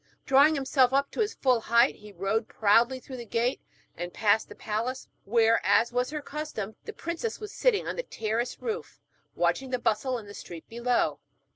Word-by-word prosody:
Drawing 280 +4 +5
himself 265 -2 +2
up 280 +1 +2
to - - -7
his 440 0 0
full 255 -3 +3
height, 235 +1 +4
he 210 0 -13
rode 200 +4 -1
proudly 230 +5 +3
through 260 0 -9
the 240 - -6
gate 235 +4 0 0.3
and 175 +1 -5
past 215 +2 +2
the - - -10
palace, 230 +5 -3 0.2
where, 230 +1 +3
as 205 +5 +3
was 250 +1 +1
her 300 0 -5
custom, 280 -9 -5
the - - -5
princess 345 +4 -4
was 425 -1 -7
sitting - - +2
on - - -3
the - - 0
terrace 230 - -3
roof, 455 0 -4 0.4
watching 265 -1 0
the 255 - 0
bustle 245 +2 0
in 225 - -9
the 205 - -10
street 170 -4 -9
below. 240 +1 0
245 Hz, 190 wpm, -28 LUFS, 220-280 Hz, 0.4 s, Drawing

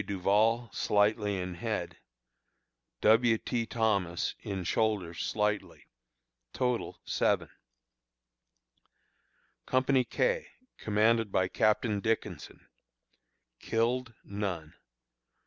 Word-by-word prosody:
Duval, 105 +4 +1
slightly 105 -1 +1
in 90 0 -4
head; 85 - -4 1.0
W. 115 +1 +5
T. 115 0 -2
Thomas, 100 -7 0
in 95 -3 -4
shoulder 100 -3 0
slightly. 105 +4 -2 0.7
Total, 125 -2 -1
7. - - +1 2.2
Company 130 0 +3
K, - - 0 0.3
commanded 110 0 +2
by 95 -1 +2
Captain 105 +2 +1
Dickinson. 110 +3 -3 0.9
Killed: 120 +1 -1
None. 95 -6 -4
110 Hz, 80 wpm, -30 LUFS, 100-115 Hz, 2.2 s, W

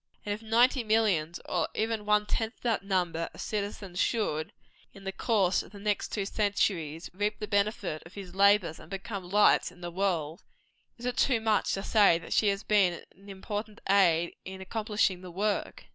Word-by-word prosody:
And 205 - -1
if 210 - -7
ninety 240 +3 +3
millions, 205 -7 +1
or 170 -3 -1
even 220 -1 -1
one 210 0 +3
tenth 225 +2 -3
that 230 -4 +1
number 180 -4 -1
of - - -13
citizens 200 -3 -4
should, 155 -9 0 0.4
in 195 - -12
the 195 - -3
course 195 -2 +1
of - - -14
the 200 - -10
next 205 0 -1
two 200 -3 -2
centuries, 185 -6 -1
reap 205 +3 -1
the 210 - -5
benefit 200 -6 0
of 165 - -15
his 190 -3 -8
labors, 200 -4 +3
and - - -14
become 195 -1 -6
lights 205 -2 +4
in 180 0 -18
the 175 0 -5
world, 170 -4 -1 0.6
is 240 - -9
it 250 0 -2
too 255 -4 +3
much 220 -1 +1
to 195 - -4
say 205 -7 +5
that 165 - -6
she 215 - +3
has 200 +1 0
been 190 -5 +2
an 200 +2 -16
important 210 +2 -5
aid 175 -4 +3
in 190 0 -8
accomplishing 205 -2 -1
the 185 - -9
work? 200 +4 -2
200 Hz, 190 wpm, -29 LUFS, 180-215 Hz, 0.6 s, say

